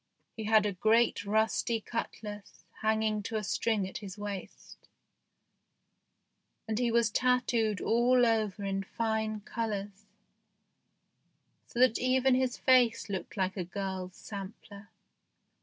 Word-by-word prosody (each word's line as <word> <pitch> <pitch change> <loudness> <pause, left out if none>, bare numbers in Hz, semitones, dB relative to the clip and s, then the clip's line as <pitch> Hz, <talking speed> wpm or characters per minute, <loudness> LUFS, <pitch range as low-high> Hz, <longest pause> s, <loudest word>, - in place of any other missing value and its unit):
He 220 - -5
had 215 -1 +4
a 205 - 0
great 220 +3 +2
rusty 220 +2 +1
cutlass 210 -2 -6 0.2
hanging 220 -1 +1
to 220 +2 -5
a 215 - -1
string 210 -1 0
at 190 - -6
his 200 -2 -8
waist, 205 -2 -8 1.8
and 220 0 -1
he 245 -1 +2
was 230 -2 +2
tattooed 245 -3 +1
all 245 +2 +3
over 215 -3 0
in 195 0 -1
fine 220 +1 -2
colours, 205 -2 -4 1.6
so - - -11
that 250 -2 +4
even 255 +1 +3
his 255 -1 +1
face 245 -4 +3
looked 195 +2 -5
like 190 0 0
a 185 - -2
girl's 185 0 -5
sampler. 200 0 -9
215 Hz, 125 wpm, -30 LUFS, 200-230 Hz, 1.8 s, had